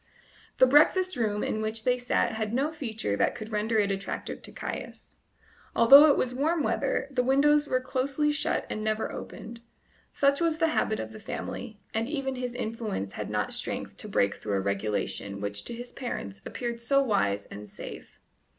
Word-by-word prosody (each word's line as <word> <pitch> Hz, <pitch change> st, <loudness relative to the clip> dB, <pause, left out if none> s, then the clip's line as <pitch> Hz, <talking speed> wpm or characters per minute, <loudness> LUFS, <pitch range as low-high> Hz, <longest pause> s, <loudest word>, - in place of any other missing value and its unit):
The -, -, +7 dB
breakfast 335 Hz, +7 st, +4 dB
room 210 Hz, -4 st, 0 dB
in 215 Hz, -, -1 dB
which 220 Hz, +1 st, -3 dB
they 250 Hz, +1 st, +2 dB
sat 245 Hz, -1 st, +1 dB
had 220 Hz, 0 st, -2 dB
no 280 Hz, +4 st, +1 dB
feature 225 Hz, -, -3 dB
that -, -, +2 dB
could 215 Hz, 0 st, -7 dB
render 220 Hz, +1 st, 0 dB
it 200 Hz, -2 st, +2 dB
attractive 195 Hz, 0 st, -4 dB
to -, -, -11 dB
Caius. -, -, -7 dB, 0.6 s
Although 275 Hz, +6 st, +9 dB
it 285 Hz, -, +4 dB
was 250 Hz, -1 st, 0 dB
warm 305 Hz, +4 st, +1 dB
weather, -, -, 0 dB
the 255 Hz, -2 st, +1 dB
windows 290 Hz, +3 st, +4 dB
were 255 Hz, -, +2 dB
closely 270 Hz, +3 st, 0 dB
shut 295 Hz, -, 0 dB
and 215 Hz, -, -4 dB
never 215 Hz, 0 st, -1 dB
opened; 230 Hz, +1 st, -8 dB, 0.5 s
such 280 Hz, +2 st, +2 dB
was 330 Hz, -2 st, +2 dB
the 325 Hz, -1 st, +2 dB
habit 220 Hz, -8 st, 0 dB
of -, -, -5 dB
the 215 Hz, -, -10 dB
family, 215 Hz, 0 st, -6 dB
and 225 Hz, +3 st, -1 dB
even 275 Hz, -3 st, -2 dB
his 250 Hz, -1 st, -4 dB
influence 215 Hz, -, -3 dB
had -, -, -5 dB
not -, -, -1 dB
strength -, -, -4 dB
to -, -, -7 dB
break 100 Hz, 0 st, +2 dB
through 105 Hz, -2 st, -3 dB
a -, -, +2 dB
regulation 100 Hz, 0 st, -2 dB
which 100 Hz, 0 st, -3 dB
to -, -, -5 dB
his 245 Hz, +1 st, -8 dB
parents 100 Hz, -, -5 dB
appeared 235 Hz, -1 st, -4 dB
so 275 Hz, +4 st, +3 dB
wise 100 Hz, -, +1 dB
and 105 Hz, +1 st, -8 dB
safe. -, -, -9 dB
235 Hz, 185 wpm, -28 LUFS, 210-275 Hz, 0.6 s, Although